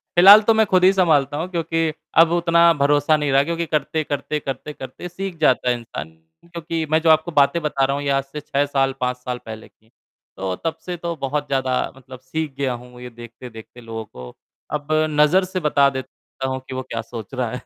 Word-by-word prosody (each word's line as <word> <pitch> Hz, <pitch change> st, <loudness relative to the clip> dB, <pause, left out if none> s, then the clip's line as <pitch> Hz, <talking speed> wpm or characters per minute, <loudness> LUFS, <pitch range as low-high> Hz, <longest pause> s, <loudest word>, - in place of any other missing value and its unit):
फिलहाल 200 Hz, +5 st, +9 dB
तो 225 Hz, -, +4 dB
मैं 220 Hz, 0 st, +3 dB
खुद 185 Hz, -2 st, +2 dB
ही 190 Hz, -, +7 dB
सँभालता 150 Hz, -6 st, +2 dB
हूँ, 165 Hz, +3 st, -3 dB
क्योंकि 165 Hz, -1 st, -1 dB, 0.3 s
अब 165 Hz, 0 st, +6 dB
उतना 170 Hz, 0 st, +4 dB
भरोसा 145 Hz, +1 st, +2 dB
नहीं 145 Hz, -2 st, -1 dB
रहा, 135 Hz, +1 st, +4 dB
क्योंकि 170 Hz, +1 st, -2 dB
करते-करते, 150 Hz, 0 st, -2 dB
करते-करते, 140 Hz, +4 st, -7 dB
सीख 185 Hz, -1 st, -6 dB
जाता 125 Hz, -3 st, +3 dB
है 125 Hz, -, +2 dB
इंसान। 80 Hz, -10 st, -8 dB, 0.4 s
क्योंकि 165 Hz, -1 st, -4 dB
मैं 160 Hz, -, +4 dB
जो 165 Hz, -, +2 dB
आपको 160 Hz, +2 st, +3 dB
बातें 145 Hz, +3 st, +3 dB
बता 150 Hz, -3 st, -1 dB
रहा 140 Hz, +1 st, -1 dB
हूँ, 145 Hz, -, -4 dB
ये 140 Hz, -, -1 dB
आज 135 Hz, 0 st, +1 dB
से 140 Hz, +2 st, -8 dB
6 145 Hz, -1 st, 0 dB
साल, 135 Hz, -1 st, 0 dB
5 125 Hz, 0 st, -1 dB
साल 125 Hz, -1 st, -5 dB
पहले 110 Hz, 0 st, -9 dB
की 110 Hz, -, -34 dB
हैं, 115 Hz, -, -30 dB, 0.5 s
तो 95 Hz, -1 st, -3 dB
तब 165 Hz, -, -1 dB
से 180 Hz, -1 st, -4 dB
तो 170 Hz, 0 st, -4 dB
बहुत 145 Hz, +1 st, -3 dB
ज़्यादा 130 Hz, -2 st, 0 dB, 0.2 s
मतलब 130 Hz, -1 st, -12 dB
सीख 150 Hz, +3 st, -4 dB
गया 135 Hz, -3 st, -1 dB
हूँ, 125 Hz, 0 st, -11 dB
ये 125 Hz, -, -8 dB
देखते-देखते 120 Hz, 0 st, -12 dB
लोगों 110 Hz, -1 st, -7 dB
को। 65 Hz, -9 st, -11 dB, 0.4 s
अब 145 Hz, -1 st, -3 dB, 0.3 s
नज़र 180 Hz, +6 st, +5 dB
से 185 Hz, 0 st, -4 dB
बता 145 Hz, -3 st, +3 dB
देता 130 Hz, 0 st, -7 dB
हूँ 130 Hz, 0 st, -3 dB
कि 130 Hz, -, -7 dB
वो 130 Hz, -, -2 dB
क्या 115 Hz, -, -2 dB
सोच 115 Hz, +2 st, -9 dB
रहा 125 Hz, -3 st, -2 dB
है। 125 Hz, -, -6 dB
145 Hz, 215 wpm, -21 LUFS, 125-165 Hz, 0.5 s, फिलहाल